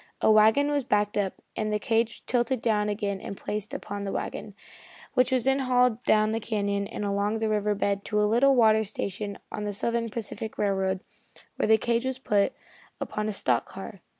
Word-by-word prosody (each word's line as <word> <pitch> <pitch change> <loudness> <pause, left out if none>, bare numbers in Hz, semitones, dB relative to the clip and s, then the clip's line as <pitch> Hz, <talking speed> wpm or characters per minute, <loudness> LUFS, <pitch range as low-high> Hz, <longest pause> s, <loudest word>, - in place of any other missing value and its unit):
A - - +4
wagon 220 +7 +5
was 290 -1 +1
backed 210 -2 +1
up, 200 -2 -2
and 215 0 -1
the 210 - +2
cage 225 0 +1
was - - -12
tilted 245 +1 0
down 210 -2 +1
again 205 -2 -2
and 195 - -7
placed 210 +2 -4
upon 205 -7 -5
the 195 - -3
wagon, - - -5 0.6
which 250 +1 +3
was 255 -2 +2
then 270 +1 +2
hauled 250 -3 +2
down 215 0 +4
the 225 - 0
canyon 200 -2 -1
and 210 - -5
along 200 +2 0
the 220 0 -1
river 210 -1 +1
bed 200 0 -1
to 210 - 0
a 210 - +4
little 250 +6 +4
water 220 -2 +5
station 200 0 -4
on 210 - -4
the 205 0 -2
Southern 230 +3 -1
Pacific 220 0 -5
Railroad, 190 -2 0 0.6
where - - +1
the 220 0 +6
cage 235 +3 0
was 260 -1 -2
put 205 -6 +1 0.5
upon 210 0 -3
a - - 0
stock 125 - 0
car. 195 0 -9
215 Hz, 205 wpm, -27 LUFS, 205-235 Hz, 0.6 s, the